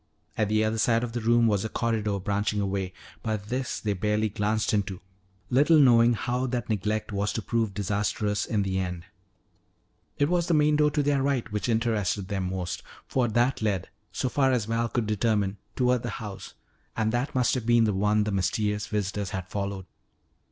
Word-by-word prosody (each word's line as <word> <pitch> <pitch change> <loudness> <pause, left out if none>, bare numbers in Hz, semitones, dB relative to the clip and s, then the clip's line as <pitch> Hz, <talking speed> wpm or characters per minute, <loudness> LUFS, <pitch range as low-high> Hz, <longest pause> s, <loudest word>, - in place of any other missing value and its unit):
At 105 -2 0
the 110 0 +2
other 110 +1 -1
side 115 +1 +3
of 120 - -3
the 120 0 -3
room 115 +1 +4
was 105 -4 +2
a 110 - -3
corridor 110 -4 -1
branching 105 +2 -1
away. 95 -2 -1 0.3
But 110 -2 -3
this 130 0 -2
they 105 -2 -1
barely 105 +3 0
glanced 105 +2 0
into, 100 -3 -1 0.5
little 145 +6 +5
knowing 120 -4 +6
how 125 +3 -1
that 120 -2 -3
neglect 110 +1 -1
was 100 +1 -1
to 115 - -2
prove 115 -4 -1
disastrous 105 +1 -1
in 105 -3 +1
the 95 -1 -1
end. 90 -2 -4 1.1
It 145 - +3
was 175 0 +1
the 170 - +3
main 150 0 +4
door 150 0 +4
to 150 0 0
their 140 -1 +2
right 135 -5 0
which 105 +3 -2
interested 110 -4 0
them 95 -2 -2
most, 90 -2 -3 0.2
for 130 -2 +1
that 120 +3 +1
led, 100 -5 -1 0.2
so - - -1
far 135 0 +2
as 120 -5 +1
Val 115 +1 -1
could 120 -1 -1
determine, 105 -2 0 0.2
toward 125 -1 +2
the 120 - -4
house. 100 -3 -8 0.4
And 110 -1 +1
that 120 +4 -2
must 125 -2 +2
have 125 -3 -2
been 120 -1 +5
the 105 -2 +2
one 105 +2 +2
the 105 - -2
mysterious 105 +2 0
visitors 100 -2 -2
had 95 0 -5
followed. 100 -2 -3
110 Hz, 195 wpm, -27 LUFS, 100-120 Hz, 1.1 s, knowing